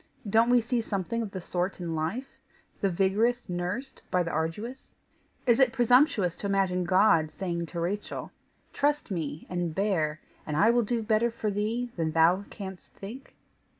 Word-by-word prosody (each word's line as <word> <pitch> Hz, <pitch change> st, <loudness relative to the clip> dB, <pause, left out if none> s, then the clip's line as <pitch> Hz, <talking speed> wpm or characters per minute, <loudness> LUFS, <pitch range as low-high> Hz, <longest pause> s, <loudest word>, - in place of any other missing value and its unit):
Don't 225 Hz, +4 st, +4 dB
we 245 Hz, -1 st, +5 dB
see 235 Hz, +1 st, 0 dB
something 220 Hz, +2 st, -2 dB
of 220 Hz, -, -3 dB
the 190 Hz, -1 st, -6 dB
sort 180 Hz, +2 st, -2 dB
in 170 Hz, -2 st, -3 dB
life 165 Hz, +12 st, -3 dB, 0.4 s
the 195 Hz, -, +1 dB
vigorous 210 Hz, +7 st, +1 dB
nursed 180 Hz, +10 st, -4 dB
by 180 Hz, -1 st, +2 dB
the 170 Hz, -, -3 dB
arduous? 185 Hz, +12 st, -4 dB, 0.5 s
Is 240 Hz, -1 st, +4 dB
it 260 Hz, -3 st, +5 dB
presumptuous 245 Hz, -, +3 dB
to 200 Hz, -, -3 dB
imagine 190 Hz, -2 st, +1 dB
God 170 Hz, -4 st, +4 dB
saying 170 Hz, -1 st, -3 dB
to 170 Hz, -, -5 dB
Rachel: 195 Hz, +5 st, -3 dB, 0.4 s
'Trust 290 Hz, -4 st, 0 dB
me, 155 Hz, -4 st, -3 dB
and 175 Hz, -3 st, -2 dB
bear, 165 Hz, -7 st, 0 dB, 0.3 s
and 150 Hz, -1 st, -2 dB
I 220 Hz, +8 st, +5 dB
will 240 Hz, 0 st, +3 dB
do 230 Hz, +1 st, -1 dB
better 220 Hz, +2 st, +2 dB
for 225 Hz, -2 st, -3 dB
thee 225 Hz, +4 st, -1 dB
than 160 Hz, -2 st, -1 dB
thou 170 Hz, +5 st, +4 dB
canst 190 Hz, -3 st, -9 dB
think? 235 Hz, +7 st, -9 dB
195 Hz, 170 wpm, -28 LUFS, 175-235 Hz, 0.5 s, we